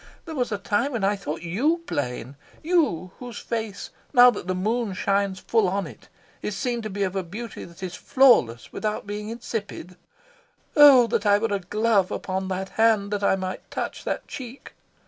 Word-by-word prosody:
There 325 Hz, -, -7 dB
was 250 Hz, -5 st, -1 dB
a 205 Hz, -, 0 dB
time 205 Hz, +8 st, 0 dB
when 225 Hz, -4 st, -2 dB
I 200 Hz, +1 st, +2 dB
thought 165 Hz, -4 st, -5 dB
YOU 285 Hz, -, 0 dB
plain 125 Hz, -, -4 dB, 0.3 s
you 295 Hz, -, +1 dB
whose 245 Hz, -3 st, -8 dB
face, 220 Hz, -3 st, -4 dB, 0.2 s
now 245 Hz, -1 st, +8 dB
that 200 Hz, -5 st, -7 dB
the 185 Hz, -, 0 dB
moon 215 Hz, +3 st, -1 dB
shines 195 Hz, 0 st, 0 dB
full 225 Hz, -4 st, +2 dB
on 195 Hz, 0 st, -1 dB
it, 130 Hz, -9 st, -13 dB, 0.3 s
is 210 Hz, -, -4 dB
seen 245 Hz, -3 st, -1 dB
to 215 Hz, -, -5 dB
be 200 Hz, 0 st, -2 dB
of 190 Hz, 0 st, -2 dB
a 190 Hz, -, 0 dB
beauty 215 Hz, +7 st, -7 dB
that 170 Hz, +2 st, -13 dB
is 180 Hz, -2 st, -4 dB
flawless 205 Hz, -, +3 dB
without 215 Hz, -1 st, -3 dB
being 210 Hz, +1 st, -5 dB
insipid. 205 Hz, -6 st, -6 dB, 0.8 s
Oh 280 Hz, -5 st, +9 dB
that 215 Hz, -2 st, -1 dB
I 205 Hz, 0 st, +6 dB
were 215 Hz, 0 st, -1 dB
a 200 Hz, -, 0 dB
glove 205 Hz, +1 st, +1 dB
upon 190 Hz, 0 st, -3 dB
that 190 Hz, 0 st, -3 dB
hand, 220 Hz, -3 st, +2 dB
that 205 Hz, -1 st, -2 dB
I 195 Hz, -, +4 dB
might 185 Hz, -1 st, -5 dB
touch -, -, -4 dB
that -, -, -3 dB
cheek! 255 Hz, -1 st, -9 dB
205 Hz, 190 wpm, -24 LUFS, 190-235 Hz, 0.8 s, Oh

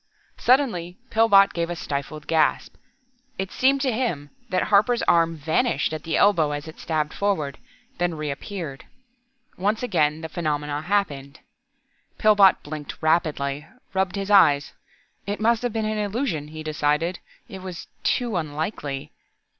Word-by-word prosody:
Suddenly 220 Hz, -10 st, +2 dB
Pillbot 205 Hz, -3 st, +5 dB
gave 170 Hz, 0 st, -2 dB
a 175 Hz, -, -3 dB
stifled 145 Hz, 0 st, -5 dB
gasp. 160 Hz, -2 st, +1 dB, 0.6 s
It 190 Hz, 0 st, -4 dB
seemed 270 Hz, +1 st, +2 dB
to 265 Hz, -2 st, +1 dB
him 175 Hz, -, -2 dB, 0.2 s
that 185 Hz, -1 st, +1 dB
Harper's 215 Hz, +4 st, +3 dB
arm 165 Hz, -1 st, +3 dB
vanished 160 Hz, -, 0 dB
at 155 Hz, -, -4 dB
the 165 Hz, -, 0 dB
elbow 165 Hz, -8 st, +3 dB
as 145 Hz, +2 st, -5 dB
it 160 Hz, -, -11 dB
stabbed 155 Hz, -2 st, -2 dB
forward, 170 Hz, -9 st, -1 dB, 0.4 s
then 175 Hz, -1 st, 0 dB
reappeared. 150 Hz, 0 st, -5 dB, 0.7 s
Once 210 Hz, +5 st, 0 dB
again 155 Hz, -9 st, +1 dB
the 160 Hz, -, -4 dB
phenomenon 150 Hz, -3 st, -3 dB
happened. 150 Hz, -8 st, -1 dB, 0.8 s
Pillbot 205 Hz, -3 st, +5 dB
blinked 150 Hz, 0 st, -7 dB
rapidly, 155 Hz, -3 st, 0 dB, 0.3 s
rubbed 190 Hz, 0 st, 0 dB
his 200 Hz, 0 st, -3 dB
eyes. 145 Hz, -8 st, +5 dB, 0.5 s
It 205 Hz, +1 st, -2 dB
must 230 Hz, +1 st, +2 dB
have 245 Hz, -1 st, -1 dB
been 220 Hz, -1 st, -1 dB
illusion, 210 Hz, -, -2 dB
he 155 Hz, +1 st, -8 dB
decided. 155 Hz, +3 st, 0 dB, 0.3 s
It 190 Hz, -, -8 dB
was 185 Hz, -2 st, -7 dB, 0.2 s
too... 235 Hz, -6 st, 0 dB
unlikely.... 150 Hz, -3 st, -4 dB
170 Hz, 140 wpm, -24 LUFS, 150-205 Hz, 0.8 s, Pillbot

